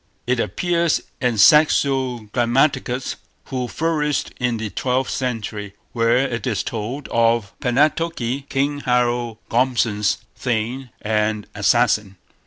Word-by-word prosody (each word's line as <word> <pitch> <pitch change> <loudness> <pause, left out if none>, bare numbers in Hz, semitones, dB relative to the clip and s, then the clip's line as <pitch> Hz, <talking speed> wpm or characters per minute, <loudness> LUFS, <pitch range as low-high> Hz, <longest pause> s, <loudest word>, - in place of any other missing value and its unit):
It 125 0 +1
appears 170 +3 +1 0.2
in 125 -3 +1
Saxo 135 -1 +4
Grammaticus, 125 +1 +1 0.3
who 125 -2 -2
flourished 150 -1 -1
in 125 -2 0
the 110 -2 -4
twelfth 130 0 -1
century, 105 -5 -4 0.2
where 115 0 +2
it 125 -5 -1
is - - 0
told 120 +6 -4
of 115 -3 +2
Palnatoki, 140 0 0
King 145 +1 0
Harold 120 -3 0
Gormson's 115 -4 +1 0.2
thane 125 +2 -2
and 105 -1 0
assassin. 105 -2 +2
125 Hz, 110 wpm, -21 LUFS, 115-135 Hz, 0.3 s, Saxo